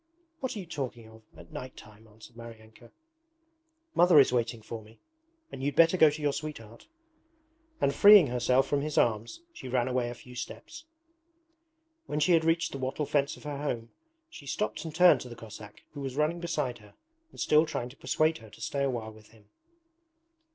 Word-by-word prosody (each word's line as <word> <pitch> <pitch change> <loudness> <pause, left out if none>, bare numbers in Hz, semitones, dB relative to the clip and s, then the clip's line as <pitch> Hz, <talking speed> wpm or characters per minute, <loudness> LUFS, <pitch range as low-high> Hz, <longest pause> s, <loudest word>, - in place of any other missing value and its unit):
'What 260 -3 -3
are - - -5
you 190 - -7
talking 130 -8 -6
of, 110 0 -16 0.2
at - - -14
night 130 -3 -8
time!' 110 +1 -15
answered 110 +2 -16
Maryanka. 115 0 -13 1.0
'Mother 175 -3 +6
is 135 -2 +4
waiting 115 -2 -1
for 115 +1 -7
me, 110 +1 -18 0.5
and - - -8
you'd 140 0 -2
better 165 +2 +5
go 160 -4 +6
to 150 +1 -6
your 145 -1 +1
sweetheart.' 115 -8 -8 0.9
And 140 - +1
freeing 205 +2 +8
herself 125 +1 +2
from 145 -1 0
his 150 +1 -4
arms 115 - 0
she 130 - -9
ran 125 -1 0
away 125 -1 -1
a 120 - -7
few 125 +1 -14
steps. 320 - -8 1.2
When 150 - -2
she 150 +4 +2
had 165 -2 +4
reached 165 +1 +1
the 135 - -6
wattle 130 +3 -2
fence 140 0 0
of - - -16
her 145 -2 -5
home 120 -6 -4 0.4
she 345 +2 -13
stopped 210 - -2
and 160 -1 -7
turned 180 +1 +6
to 125 - -8
the 120 - -9
Cossack 105 -2 -12
who 145 - -9
was 135 -2 -5
running 155 +4 0
beside 150 -8 -3
her 105 -1 -18 0.3
and - - -16
still 155 +1 +4
trying 120 -4 -4
to 130 - -15
persuade 155 +2 0
her 110 -1 -14
to - - -17
stay 140 -1 -2
a 135 - +1
while 115 -3 -4
with 110 -1 -17
him. 105 -2 -23
130 Hz, 200 wpm, -29 LUFS, 115-155 Hz, 1.2 s, freeing